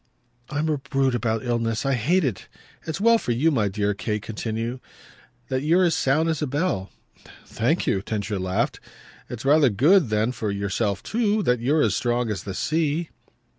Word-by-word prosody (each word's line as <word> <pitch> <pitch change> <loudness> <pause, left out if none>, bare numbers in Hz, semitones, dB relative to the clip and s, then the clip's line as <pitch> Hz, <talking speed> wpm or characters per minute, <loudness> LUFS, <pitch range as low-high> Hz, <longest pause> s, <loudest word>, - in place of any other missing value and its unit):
"I'm 150 +1 -1
a 150 -2 0
brute 135 -1 0
about 115 -1 -1
illness. 115 0 -1
I 135 - +2
hate 160 +10 +2
it. 125 -9 -3 0.4
It's 160 +1 -3
well 230 +2 +5
for 120 - -1
you, 150 +8 +2
my 110 -8 +1
dear," 105 +1 -1
Kate 105 +1 -3
continued, 115 +3 -4 0.7
"that 130 0 -1
you're 170 +5 +3
as 170 -2 +3
sound 150 +5 +2
as 160 -2 -1
a 150 - 0
bell." 140 - -1 0.6
"Thank 145 +10 0
you!" 95 - +1
Densher 100 -1 -3
laughed. 95 0 -1 0.5
"It's 120 +1 -7
rather 145 -1 +5
good 145 - +4
then 110 +2 +1
for 110 -4 -3
yourself 100 0 -2
too 215 -2 0
that 125 -6 +2
you're 145 +6 +2
as 105 -3 +1
strong 120 -1 0
as 95 -4 -5
the 95 -2 -5
sea." 160 +1 0
125 Hz, 180 wpm, -24 LUFS, 110-155 Hz, 0.7 s, well